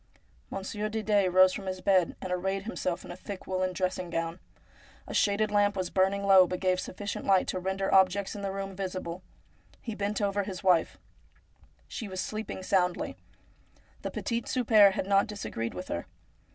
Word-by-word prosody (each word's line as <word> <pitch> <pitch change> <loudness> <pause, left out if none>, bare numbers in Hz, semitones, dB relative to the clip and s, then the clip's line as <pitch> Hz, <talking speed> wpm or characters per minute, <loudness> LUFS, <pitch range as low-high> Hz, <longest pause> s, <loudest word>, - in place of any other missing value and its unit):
Monsieur 210 +2 -4
Didet 210 -3 +1
rose 185 0 +6
from 195 - -6
his 185 0 -3
bed, 185 -2 +2
and 185 - -5
arrayed 190 +2 -1
himself 185 -5 -3
in - - -8
a - - -6
thick 185 +1 -8
woollen 185 0 -1
dressing 185 -1 -2
gown. 165 +1 -3 0.7
A - - -8
shaded 210 +1 +2
lamp 205 -1 +2
was 185 -2 -2
burning 195 +1 +2
low, 190 -2 +7
but 180 0 -3
gave 185 -1 +1
sufficient 200 +2 -5
light 190 -2 +4
to 185 - -1
render 190 +1 -1
objects 190 +1 +3
in 205 - -6
the 195 -1 -2
room 195 0 -5
visible. 185 -2 -4 0.6
He 230 - -6
bent 205 0 -2
over 200 -1 +1
his 195 -1 -6
wife. 180 -3 +3 0.9
She 220 - -6
was 185 -1 -6
sleeping 215 -2 -4
soundly. 180 -2 0 0.9
The - - -3
petit 235 0 -3
souper 215 -5 +5
had 190 - -2
not 195 +1 +3
disagreed 160 - -4
with 180 - -6
her. 85 - -3
190 Hz, 180 wpm, -29 LUFS, 185-200 Hz, 0.9 s, low